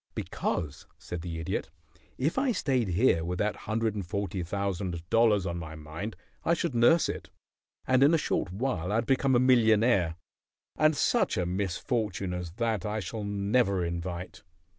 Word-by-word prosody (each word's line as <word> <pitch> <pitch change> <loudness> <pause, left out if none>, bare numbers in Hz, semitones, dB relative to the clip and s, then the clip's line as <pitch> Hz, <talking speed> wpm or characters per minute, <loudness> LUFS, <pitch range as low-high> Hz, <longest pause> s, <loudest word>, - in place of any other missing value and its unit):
"Because," 75 -5 -3
said 85 -1 -6
the 85 -1 -5
Idiot, 80 - -3 0.5
"if 150 - 0
I 265 -2 +2
stayed 130 - 0
here 90 -2 +3
with 90 +2 -3
that 105 +2 0
hundred 110 0 +1
and 105 -2 -3
forty 95 0 -3
thousand 90 -2 -3
dollars 110 -4 +4
on 85 -1 -3
my 80 -1 -7
mind 80 +8 -6 0.3
I 170 - +3
should 170 -4 -2
nurse 120 +8 +5
it, - - -5 0.6
and 130 0 +3
in 140 +3 +7
a 165 - +4
short 100 - -1
while 95 -4 -2
I'd 115 +3 +1
become 135 0 +2
a - - +5
millionaire, 110 -8 +4 0.6
and 155 -1 +3
such - - +2
a 90 - +1
misfortune 95 +1 -2
as 90 -2 -5
that 110 -2 -1
I 105 0 -2
shall 105 +3 -5
never 100 -1 +1
invite. 85 +1 -5
100 Hz, 165 wpm, -29 LUFS, 90-120 Hz, 0.6 s, in